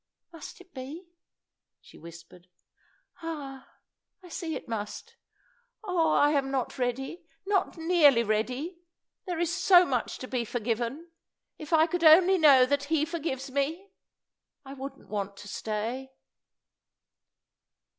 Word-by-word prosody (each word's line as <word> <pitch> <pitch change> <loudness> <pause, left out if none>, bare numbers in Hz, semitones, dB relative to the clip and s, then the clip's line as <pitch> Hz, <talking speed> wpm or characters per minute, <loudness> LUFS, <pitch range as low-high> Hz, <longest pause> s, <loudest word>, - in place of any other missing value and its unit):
"Must 330 +2 -10
it 370 -1 -18
be?" 300 +7 -9 0.7
she - - -17
whispered. 170 +2 -14 0.7
"Ah, 285 -5 -7 0.5
I 360 - -13
see 325 -1 -4
it - - -7
must! 210 -3 -6 0.7
Oh, 345 -6 +1
I'm 290 -2 +3
not 265 -1 -3
ready 270 +7 -3 0.2
not 390 -3 0
nearly 320 -7 +4
ready. 250 - -2 0.5
There's 345 -1 -1
so 360 0 +6
much 250 -6 -2
to 255 - -8
be 250 -2 -2
forgiven; 240 +8 -3 0.5
if 305 0 -9
I 320 -1 +5
could 345 +1 -3
only 355 +4 +7
know 275 -5 +7
that 285 +2 0
He 305 0 +1
forgives 295 -5 -4
me, 315 +9 -2 0.7
I 270 - -9
wouldn't 275 0 -9
want 200 -1 -4
to 205 - -11
stay." 225 +6 -4
285 Hz, 125 wpm, -28 LUFS, 250-335 Hz, 0.7 s, only